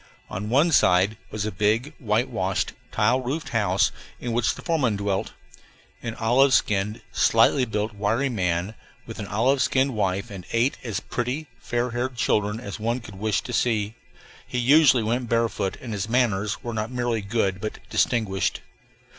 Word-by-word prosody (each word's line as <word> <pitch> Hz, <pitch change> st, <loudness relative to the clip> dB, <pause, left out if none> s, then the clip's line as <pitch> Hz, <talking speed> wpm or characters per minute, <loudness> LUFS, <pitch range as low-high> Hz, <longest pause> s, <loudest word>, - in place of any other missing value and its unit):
On 105 Hz, +3 st, -4 dB
one 145 Hz, +8 st, +4 dB
side 95 Hz, -, +4 dB
was 105 Hz, -1 st, -3 dB
a 110 Hz, -, -2 dB
big, 110 Hz, -, 0 dB
whitewashed, 105 Hz, -5 st, 0 dB, 0.2 s
tile 115 Hz, +5 st, +2 dB
roofed 135 Hz, +3 st, -3 dB
house 105 Hz, -3 st, +2 dB, 0.3 s
in 120 Hz, -, -4 dB
which 115 Hz, 0 st, +1 dB
the -, -, -11 dB
foreman 145 Hz, -, +1 dB
dwelt 100 Hz, -1 st, -2 dB, 0.7 s
an 115 Hz, -1 st, -4 dB
olive 125 Hz, +4 st, +4 dB
skinned, 105 Hz, 0 st, 0 dB
slightly 115 Hz, +4 st, +4 dB
built, 105 Hz, -1 st, -2 dB
wiry 110 Hz, +6 st, 0 dB
man, 90 Hz, -4 st, -1 dB, 0.3 s
with -, -, -9 dB
an 100 Hz, -, -5 dB
olive 125 Hz, +7 st, +2 dB
skinned 135 Hz, -1 st, +2 dB
wife 100 Hz, 0 st, -1 dB
and 95 Hz, -2 st, -8 dB
eight 120 Hz, +4 st, +2 dB
as 115 Hz, -5 st, -3 dB
pretty, 125 Hz, +6 st, -3 dB
fair 120 Hz, 0 st, -2 dB
haired 125 Hz, +2 st, -2 dB
children 105 Hz, -2 st, +1 dB
as 105 Hz, -3 st, -7 dB
one 115 Hz, +3 st, -1 dB
could 105 Hz, -5 st, -11 dB
wish 110 Hz, -1 st, 0 dB
to 125 Hz, -, -7 dB
see. 110 Hz, -3 st, +1 dB, 0.5 s
He -, -, -4 dB
usually 135 Hz, 0 st, +5 dB
went 120 Hz, +2 st, -1 dB
barefoot, 115 Hz, -4 st, 0 dB
and 120 Hz, -4 st, -6 dB
his 105 Hz, +1 st, -3 dB
manners 110 Hz, -4 st, +1 dB
were 120 Hz, -, -4 dB
not 110 Hz, 0 st, -2 dB
merely 120 Hz, -3 st, -1 dB
good 100 Hz, -2 st, -1 dB
but 110 Hz, -, -4 dB
distinguished. 100 Hz, -6 st, +1 dB
115 Hz, 165 wpm, -24 LUFS, 105-125 Hz, 0.7 s, usually